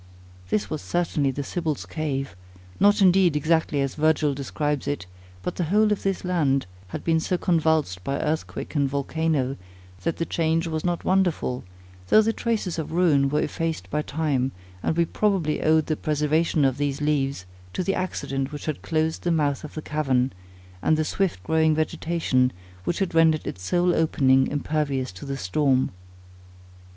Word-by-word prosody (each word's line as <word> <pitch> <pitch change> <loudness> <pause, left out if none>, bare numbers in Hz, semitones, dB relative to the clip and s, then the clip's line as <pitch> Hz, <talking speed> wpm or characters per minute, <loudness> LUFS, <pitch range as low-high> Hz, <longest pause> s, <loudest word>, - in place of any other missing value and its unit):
This 105 0 0
was - - -4
certainly 150 - 0
the 140 +2 -3
Sibyl's 155 -1 -3
Cave; 140 -6 -3 0.4
not 205 +1 +5
indeed 180 -3 +5
exactly 155 -1 +1
as 135 -1 -1
Virgil 155 -1 +2
describes 145 +1 -2
it; 145 -10 -2 0.4
but 180 - -4
the 175 - 0
whole 210 +5 +3
of 210 - 0
this 195 -1 -1
land 145 -7 +1 0.2
had - - -6
been 165 -1 +2
so 180 +3 0
convulsed 160 - +1
by 140 - -1
earthquake 155 +1 -3
and 140 -3 +1
volcano, 140 -1 -1 0.4
that 165 - -1
the 165 - -1
change 165 0 0
was 160 -2 -3
not 175 -1 -1
wonderful, 180 -9 +1 0.4
though 215 - +6
the 225 +1 +1
traces 215 -9 -1
of 160 - -4
ruin 155 -5 +3
were 150 +2 +1
effaced 165 -2 -3
by 150 - +1
time; 140 -4 -1 0.3
and 160 - -1
we 170 - +4
probably 185 -5 0
owed 155 0 +3
the 155 - 0
preservation 150 0 +1
of 135 0 +1
these 145 -1 -1
leaves, 140 -7 0 0.3
to 185 - -2
the 195 - 0
accident 140 -7 -2
which 145 -1 -7
had 155 -3 -3
closed 160 0 -1
the 175 - -1
mouth 145 -3 +1
of 155 - -9
the 155 - -5
cavern, 135 -4 0 0.5
and 155 - +3
the 155 - +1
swift 170 - -1
growing 160 +4 +3
vegetation 155 -5 +1 0.3
which 175 - 0
had 195 -4 -1
rendered 160 -1 +4
its 90 - -5
sole 175 - +2
opening 135 -5 +3
impervious 145 -3 -1
to 95 +8 -10
the 135 0 -3
storm. 130 +5 +1
155 Hz, 170 wpm, -25 LUFS, 140-165 Hz, 0.5 s, though